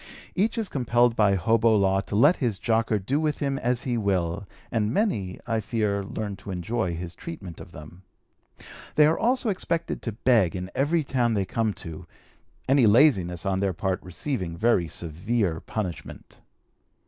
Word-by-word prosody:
Each 215 +5 0
is 225 -3 0
compelled 120 -4 +2
by 100 -3 +3
hobo 115 +3 +3
law 95 -1 +3
to 100 - -5
let 120 - +5
his 115 -7 -1
jocker 110 0 +1
do 125 +9 -1
with 155 -1 0
him 140 -2 -1
as 120 0 0
he 120 -3 -1
will, 95 -1 -1 0.2
and 110 -2 0
many, 105 - -1
I 115 -1 0
fear, 105 -2 -1
learn 100 0 -5
to 100 - -11
enjoy 90 0 -2
his 85 0 -6
treatment 85 0 -8
of - - -12
them. 75 +4 -12 0.9
They 150 - +6
are 155 +2 +2
also 245 0 +1
expected 170 -4 -2
to 115 - -4
beg 110 -6 +2
in 90 +1 -5
every 155 +4 +1
town 125 -4 0
they 100 -2 0
come 110 +2 -1
to, 80 +1 -8 0.6
any 135 -3 +5
laziness 100 - +4
on 95 -1 0
their 100 -1 0
part 95 +1 -2
receiving 90 - -3
very 110 -4 +2
severe 85 +3 -2
punishment. 95 -5 -6
110 Hz, 170 wpm, -26 LUFS, 95-125 Hz, 0.9 s, They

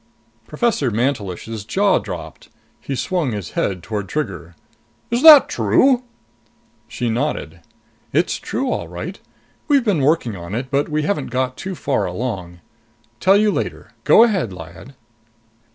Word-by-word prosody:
Professor 230 - 0
Mantelish's 110 -3 -2
jaw 195 - +2
dropped. - - -8 0.3
He 135 - -5
swung 160 -3 -1
his 100 -6 -5
head 95 -3 -2
toward 105 -4 -4
Trigger. 95 - -4 0.6
"Is 240 +1 +1
that 310 -2 +10
true?" 260 -2 +2 0.8
She 120 - -4
nodded. 115 - -2 0.5
"It's - - +1
true, - - -3
all 85 - -3
right. 120 - -7 0.5
We've 285 -4 +3
been 195 -9 +1
working 135 -6 +1
on 85 +2 -7
it, 130 +2 -4
but 140 +1 0
we 155 0 -1
haven't 150 -4 -1
got 130 +1 -2
too 190 +5 -6
far 140 -5 -1
along. 90 -4 -5 0.6
Tell 195 +2 +5
you 210 0 +3
later. - - -4
Go 225 - +7
ahead, 190 - +1
Lyad." 85 +8 -11
130 Hz, 140 wpm, -20 LUFS, -, 0.8 s, that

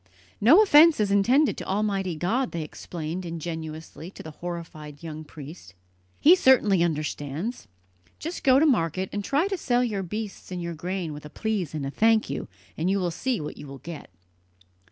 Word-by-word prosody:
"No 310 - +7
offence 325 - +7
is 205 -2 +1
intended 250 +9 +3
to - - -5
Almighty 195 -3 -1
God," 225 +11 -1
they 165 -2 -2
explained 165 +3 -6
ingenuously 160 -1 -6
to - - -11
the 160 - -8
horrified 160 -3 -8
young 155 -1 -6
priest. 150 - -11 0.4
"He 335 +5 +7
certainly 235 - +4
understands. 155 - -2 0.5
Just 335 +3 -6
go 260 -1 +6
to 300 - +5
market, 185 - +1
and 205 - -2
try 290 - +1
to 395 -1 -2
sell 245 -3 +2
your 210 -5 -1
beasts 205 +2 -6
and 180 - -3
your 170 -1 -4
grain 175 0 -4
with 150 - -9
a 150 - -9
'please' 195 -4 -2
and 145 -3 -3
a 135 - -3
'thank 220 -3 +3
you,' 140 - -4 0.3
and 165 +3 -1
you 195 - +2
will 180 -3 -1
see 245 +7 -1
what 150 - -6
you 145 - -9
will 135 0 -9
get!" 160 +2 -9
180 Hz, 185 wpm, -26 LUFS, 155-225 Hz, 0.5 s, No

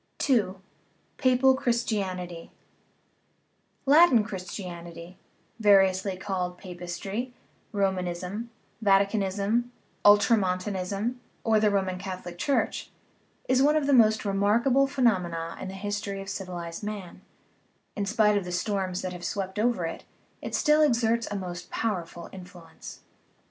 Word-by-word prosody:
II. 220 -8 +2 0.6
PAPAL 255 +1 +4
CHRISTIANITY 195 -9 -2 1.3
Latin 280 -5 +6
Christianity, 180 -3 -8 0.4
variously 195 -2 +4
called 180 -2 -3
Papistry, 195 +6 -5 0.4
Ro 200 -2 +2
manism, 185 +4 -4 0.4
Vaticanism, 200 +2 +2 0.4
Ultramontanism, 205 +1 +2 0.2
or 220 -1 +3
the 210 0 +3
Roman 190 -2 -1
Catholic 180 -2 -7
Church, 280 - 0 0.6
is 260 0 +3
one 295 +2 +4
of 305 -2 +2
the 280 - +2
most 220 -3 +5
remarkable 225 +7 +3
phe 275 -1 -5
nomena 175 -7 0
in - - -5
the 190 - -7
history 205 0 -4
of 195 0 -7
civilized 175 -4 -5
man; 205 -4 -6 0.7
in 200 -1 -2
spite 210 0 +3
of - - -7
the 180 - -6
storms 185 0 -2
that 185 -1 -3
have 175 -1 -9
swept 195 +1 -3
over 225 -6 +1
it, 165 - -5 0.4
it - - -4
still 300 +1 +4
exerts 235 -5 +2
a 205 - -4
most 180 -2 -6
pow 225 -1 0
erful 170 0 -9
influence. 180 -3 -11
195 Hz, 125 wpm, -27 LUFS, 180-225 Hz, 1.3 s, Latin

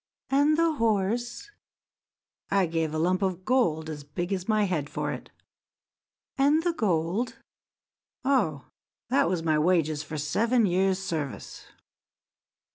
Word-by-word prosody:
"And 290 +3 +4
the 335 0 +3
horse?" 230 - 0 1.0
"I 195 -1 +3
gave 165 -2 -1
a 155 - -3
lump 180 +4 +1
of 185 -1 -2
gold 170 -12 +1
as 150 -2 -6
big 175 +6 -4
as 185 +2 -4
my 215 -1 +3
head 160 -7 -1
for - - -3
it." - - -7 1.1
"And 295 +4 +4
the 345 -1 +1
gold?" 195 - 0 0.9
"Oh, 165 - +1 0.4
that - - +3
was 175 -3 -1
my 155 -2 +2
wages 155 -3 +2
for 155 0 -6
seven 225 - +2
years' 190 +1 +2
service." 155 - -5
185 Hz, 130 wpm, -27 LUFS, 160-230 Hz, 1.1 s, And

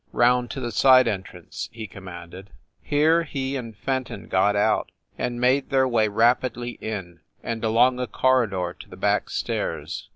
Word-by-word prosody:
"Round 125 0 +3
to 135 - -5
the 120 -2 -3
side 130 +4 +6
entrance!" 95 -3 -5
he 115 -1 -7
commanded. 90 -1 -10 0.3
Here 155 +3 +3
he 140 -4 -3
and 115 -5 -6
Fenton 130 +1 -4
got 100 +2 +2
out, 100 - +1 0.2
and 120 0 -3
made 130 +3 +2
their 130 -1 +3
way 115 -3 +2
rapidly 120 +2 +1
in, 95 -6 -5 0.2
and 115 -1 -4
along 120 +3 +3
a 125 - -2
corridor 110 -11 +1
to - - -12
the - - -11
back - - +1
stairs. - - -3
120 Hz, 160 wpm, -24 LUFS, 105-130 Hz, 0.3 s, side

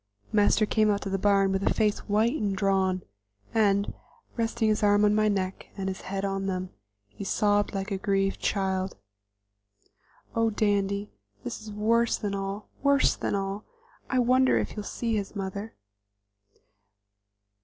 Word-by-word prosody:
Master 210 +1 +4
came 215 0 +2
out 200 -1 0
to 195 - -4
the 195 - 0
barn 195 -1 +3
with 195 0 0
a - - +2
face 210 -2 +1
white 215 +3 +3
and 205 -9 -1
drawn, 190 -2 +1 0.5
and, 200 -2 +2 0.4
resting 225 -1 0
his 215 - +1
arm 205 0 +4
on 210 - +4
my 215 0 +3
neck 195 -2 -2
and 195 -1 -3
his 190 0 -4
head 195 +1 -3
on 195 0 -2
them, 185 -1 -3 0.4
he 155 - -8
sobbed 205 +1 +1
like 195 +1 -3
a 195 - -1
grieved 195 0 0
child. 190 -1 -1 1.4
"Oh, 230 0 +3
Dandy, 205 -1 0 0.3
this 120 - -5
is 215 0 -9
worse 230 +3 +2
than 205 -2 -3
all, 195 +1 -4
worse 280 -1 +4
than - - -2
all! 195 +1 -3 0.5
I 260 - 0
wonder 255 +1 +4
if - - -1
he'll 210 - -5
see 230 +2 -2
his 200 +1 -4
mother?" 200 +2 -5
205 Hz, 160 wpm, -27 LUFS, 195-215 Hz, 1.4 s, Master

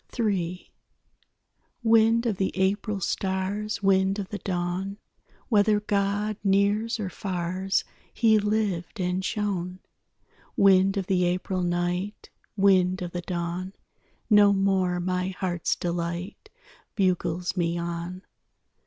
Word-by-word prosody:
III 185 -5 -1 1.1
Wind 225 +1 +4
of 220 -5 0
the 190 - 0
April 200 +2 0
stars, 195 +3 -2
Wind 195 0 +3
of 195 -2 -4
the 205 - -5
dawn, 180 +2 -3 0.5
Whether 210 -2 +4
God 205 0 -1
nears 205 +3 +2
or 205 - -2
fars, 185 0 -2 0.3
He 220 -2 +4
lived 210 -2 -1
and 180 +1 -1
shone. 185 -4 -2 0.8
Wind 195 0 +5
of 195 - -1
the 180 -2 +2
April 185 +1 -1
night, 175 +3 -2 0.3
Wind 185 -2 +3
of 175 - -5
the 175 - -4
dawn, 175 +1 -4 0.5
No 205 -2 +6
more 190 -2 +1
my 180 +1 -1
heart's 175 -3 -1
delight 175 - -4 0.5
Bugles 180 -3 0
me 170 -2 0
on. 170 +2 -5
190 Hz, 115 wpm, -26 LUFS, 180-205 Hz, 1.1 s, No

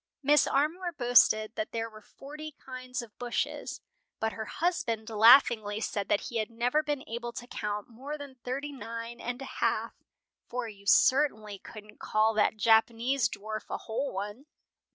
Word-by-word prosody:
Mrs. 295 0 +5
Armour 340 +6 0
boasted 240 -5 +4
that 215 - -4
there 225 0 -2
were 215 -1 -13
forty 300 +7 -10
kinds 255 -1 -6
of 220 -3 -14
bushes, 245 -1 -3 0.4
but 220 0 -1
her 220 - -5
husband 230 -9 -1
laughingly 220 -1 +6
said 205 -2 -3
that 205 - +3
he 235 - -4
had 215 0 -1
never 245 +6 +1
been 295 -3 -3
able 235 +1 -4
to 245 - -7
count 210 -3 -4
more 270 +6 -7
than 280 -3 -10
thirty 275 +4 -3
nine 230 -2 -7
and 245 +2 -4
a - - -9
half; - - +1 0.6
"for 245 -1 -3
you 200 -2 -12
certainly 220 -8 +3
couldn't 210 0 -12
call 215 +1 +2
that 215 0 +2
Japanese 230 +3 +3
dwarf 215 +1 -6
a - - -2
whole 250 +5 -3
one!" 205 +8 -6
235 Hz, 165 wpm, -29 LUFS, 215-270 Hz, 0.6 s, laughingly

